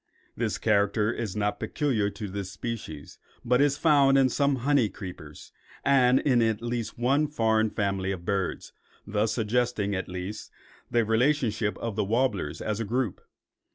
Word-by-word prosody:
This - - -1
character 105 +1 +2
is 110 -6 -4
not 105 -1 -1
peculiar 120 -9 0
to 105 +1 -6
this 100 -1 -5
species, 95 -8 -7 0.3
but 125 +2 +3
is 145 0 +3
found 140 -4 +4
in 135 -1 +4
some 140 +2 +1
honey 140 -7 +3
creepers 90 -6 -10 0.3
and 130 -2 +5
in 125 -5 +3
at 110 -2 +1
least 120 -2 -3
one 135 +6 +2
foreign 110 -6 +1
family 100 -2 -1
of 90 -3 -6
birds, 95 -2 -2 0.3
thus 105 +1 0
suggesting, 110 -2 0
at 95 -1 -3
least, 90 +4 -6 0.4
the 120 -1 +2
relationship 115 -2 +1
of 115 -3 -4
the 110 - +1
warblers 105 - -1
as 105 0 -2
a - - -1
group. 120 -1 -2
110 Hz, 155 wpm, -27 LUFS, 100-125 Hz, 0.4 s, and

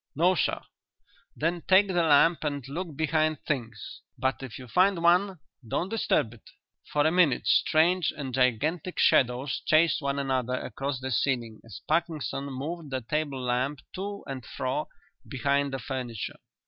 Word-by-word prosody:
"No, 175 +5 +4
sir." 170 - 0 0.8
"Then 170 +3 -1
take 190 +2 +6
the 190 - -4
lamp 165 +1 +4
and 145 -4 -3
look 160 +2 -5
behind 155 0 +1
things. 115 -7 -4 0.2
But 130 +1 -1
if 130 -5 -7
you 125 - -10
find 180 - +2
one 180 +3 +3 0.3
don't 175 - -1
disturb 200 - 0
it." 115 - -17 0.4
For 145 0 +2
a 155 - +4
minute 165 -8 +3
strange 170 +2 +3
and 135 -3 -5
gigantic 145 +8 0
shadows 125 +2 +2
chased 160 +1 +3
one 140 0 -1
another 130 -2 -1
across 135 +1 -4
the 130 0 -4
ceiling 120 -4 -1
as 110 -4 -11
Parkinson 155 -5 -1
moved 145 +4 -5
the 130 -1 -3
table 140 +1 -2
lamp 130 +4 -1
to 200 +2 -5
and 135 -2 -6
fro 130 +6 -3 0.4
behind 140 +1 0
the 135 - -2
furniture. 125 -6 -5
140 Hz, 155 wpm, -27 LUFS, 130-165 Hz, 0.8 s, take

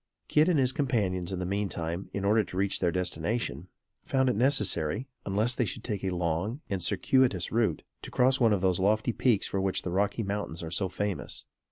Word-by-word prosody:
Kit 155 +3 +4
and 170 - +3
his 130 -2 +3
companions 100 -10 -1
in 95 - -2
the 90 - -3
mean 100 +2 -1
time, 85 +3 -4
in 100 0 -3
order 105 +2 +4
to 90 - -8
reach 100 0 +1
their 90 -2 +1
destination, 90 - -2 0.3
found 130 -1 +1
it 125 - +1
necessary, 105 - +1 0.2
unless 105 +5 +1
they 125 - +1
should 110 - -5
take 105 -5 -4
a 95 - 0
long 90 - -1
and 95 -2 -1
circuitous 105 +1 +2
route, 110 -8 +1 0.2
to - - -8
cross 130 +2 +3
one 115 -3 +4
of 100 -3 +1
those 95 -2 +2
lofty 110 +4 +2
peaks 115 -5 +2
for 95 - -1
which 95 -1 0
the 90 - -3
Rocky 100 +4 0
Mountains 100 -5 -4
are 80 - -6
so 95 +2 +1
famous. 100 0 -4
100 Hz, 210 wpm, -29 LUFS, 90-120 Hz, 0.3 s, Kit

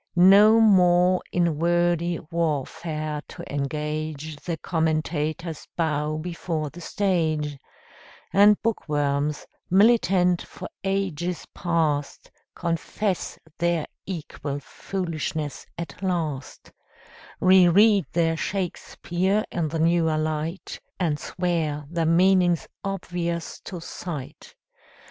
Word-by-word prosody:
No 200 +5 +7
more 180 -4 +5
in 170 -4 +1
wordy 175 0 +2
warfare 155 -1 -2
to - - -9
engage, 150 +1 -3
The 165 +2 -4
commentators 160 0 -2
bow 155 -2 0
before 160 -2 -3
the 175 - -11
stage, 160 -7 0 0.7
And 205 +1 +6
bookworms, 145 -8 -1 0.2
militant 190 -3 +4
for - - -9 0.2
ages 180 -3 -2
past, 160 -5 -1 0.2
Confess 180 +3 -2 0.2
their 170 -2 +1 0.2
equal 150 -5 -5
foolishness 155 -3 -4
at 170 0 -7
last, 165 -8 -3 0.7
Reread 190 +2 +5
their 165 -1 +2
Shakspeare 190 +2 -1
in 170 -3 -1
the 160 +2 -3
newer 165 -1 +2
light 155 +3 -3 0.2
And 155 -5 0
swear 165 -5 -2
the 165 -2 0
meaning's 175 0 +4 0.2
obvious 175 -3 -3
to 180 - -6
sight. 160 -4 -7
170 Hz, 95 wpm, -25 LUFS, 155-180 Hz, 0.7 s, No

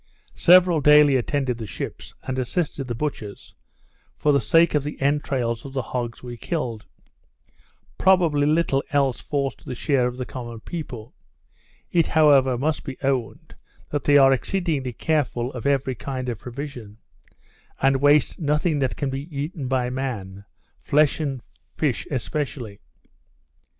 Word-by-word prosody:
Several 175 -2 +5
daily 150 -1 +6
attended 130 -1 -1
the 110 - -5
ships, - - -7
and 130 0 -3
assisted 135 +1 -2
the 120 - -3
butchers, 115 -6 -5 0.6
for 150 - +2
the 140 - +3
sake 165 0 +4
of 150 -2 +1
the 150 - -6
entrails 135 -5 0
of 135 - -9
the 130 -2 -2
hogs 120 -1 -3
we 120 -1 -7
killed. 115 -6 -4 1.1
Probably 170 -6 +4
little 150 -3 +2
else 140 -3 +1
falls 140 -2 -2
to - - -22
the 125 - -5
share 130 -1 +1
of 125 0 -5
the 125 - -4
common 120 -3 -8
people. 125 -9 -7 0.8
It 170 -2 +3
however 140 -5 +4
must 150 +4 -1
be 135 -2 -7
owned, 130 -4 -2 0.4
that 145 -2 -2
they 145 0 +6
are 135 -1 +6
exceedingly 150 -3 -1
careful 130 -2 -1
of 125 +2 -4
every 135 -2 +1
kind 130 0 -5
of 115 -4 -4
provision, 125 -5 -8 0.8
and 135 0 +3
waste 145 0 +3
nothing 150 0 +1
that 130 -2 0
can 140 -2 -2
be 135 +3 -5
eaten 145 0 -4
by 125 -1 0
man; 100 -7 -5 0.3
flesh 150 +1 +2
and 135 -6 -3 0.3
fish 145 -6 -1
especially. 130 -5 -4
135 Hz, 150 wpm, -23 LUFS, 125-150 Hz, 1.1 s, daily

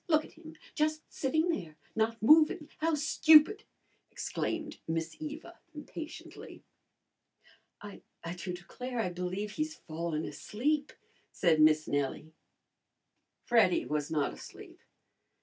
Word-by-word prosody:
Look 310 -2 +3
at - - -16
him! 320 0 -13 0.2
Just 310 0 0
sitting 315 +5 0
there 165 - -3 0.2
not 225 0 0
moving. 305 +3 +5
How 320 0 +2
stupid!" 310 +5 +5 0.4
exclaimed 310 -2 -4
Miss 165 0 -2
Eva 315 +3 -8 0.2
impatiently. 305 +1 -9 1.2
"I 205 -1 -10 0.4
do 180 - -5
declare, 245 +8 -6
I 220 - 0
believe 180 +4 -3
he's 310 +5 -3
fallen 160 -1 -4
asleep," 290 +6 -2 0.4
said 165 -4 +3
Miss 155 0 +5
Nellie. 145 +2 -2 1.1
Freddy 225 -7 +4
was 150 -1 -2
not 150 -3 0
asleep. - - -12
240 Hz, 115 wpm, -31 LUFS, -, 1.2 s, moving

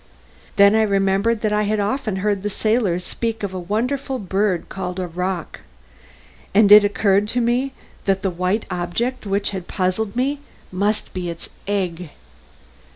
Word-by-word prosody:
Then 200 0 +6
I 220 - +4
remembered 200 +2 +2
that 215 -1 0
I 210 - +2
had 210 0 0
often 215 +1 -1
heard 205 -2 +1
the 210 - -2
sailors 210 -4 0
speak 225 -2 -3
of 195 -2 -3
a 185 - -3
wonderful 250 +9 -2
bird 195 -3 -1
called 180 -1 -5
a 185 - -1
roc, 180 0 -4 1.0
and 205 -1 +6
it 210 0 +10
occurred 205 0 +2
to 245 - -1
me 245 +3 +1 0.3
that 195 0 +1
the 190 - +1
white 185 +5 -1
object 205 +8 -2
which 200 +1 0
had 190 -3 -5
so - - -10
puzzled 200 +3 0
me 275 +4 0 0.3
must 205 +3 -1
be 180 -2 -3
its 170 -1 -7 0.2
egg. 180 -4 -2
200 Hz, 165 wpm, -21 LUFS, 185-220 Hz, 1.0 s, it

